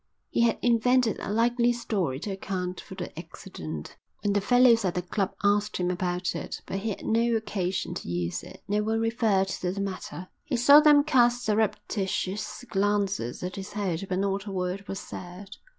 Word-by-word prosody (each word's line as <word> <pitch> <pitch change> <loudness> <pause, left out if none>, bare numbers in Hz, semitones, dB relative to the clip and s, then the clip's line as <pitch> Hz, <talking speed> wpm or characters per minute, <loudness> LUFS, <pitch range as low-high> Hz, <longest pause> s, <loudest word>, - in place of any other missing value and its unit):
He - - +1
had 235 -1 +3
invented 245 -1 +3
a - - -4
likely 235 +2 +3
story 195 - -2
to 205 - -4
account 185 -1 -4
for - - -11
the - - -6
accident 80 -1 -8 0.3
when 205 -1 +1
the 205 - +2
fellows 245 +1 +5
at 185 -3 -1
the 180 - -1
club 195 +2 -2
asked 205 +1 +2
him 180 0 0
about 180 0 -1
it, - - -5
but 195 - -3
he 220 +3 -3
had 205 - -5
no 230 +1 +2
occasion 190 -4 -2
to - - -6
use 85 -1 -2
it. - - -13
No 205 +1 +1
one 220 +1 0
referred 225 -4 +1
to 180 -1 -2
the 195 - -5
matter. 185 -2 -5
He 270 - -2
saw 280 +5 +8
them 300 -1 +6
cast 245 -2 +3
surreptitious 210 0 -1
glances 200 - 0
at 180 +2 -4
his 195 0 -7
head, 195 -3 -2
but 185 - 0
not 195 +1 -1
a - - -4
word 185 +1 -3
was 195 - -4
said. 185 +3 -9
200 Hz, 190 wpm, -27 LUFS, 185-225 Hz, 0.3 s, saw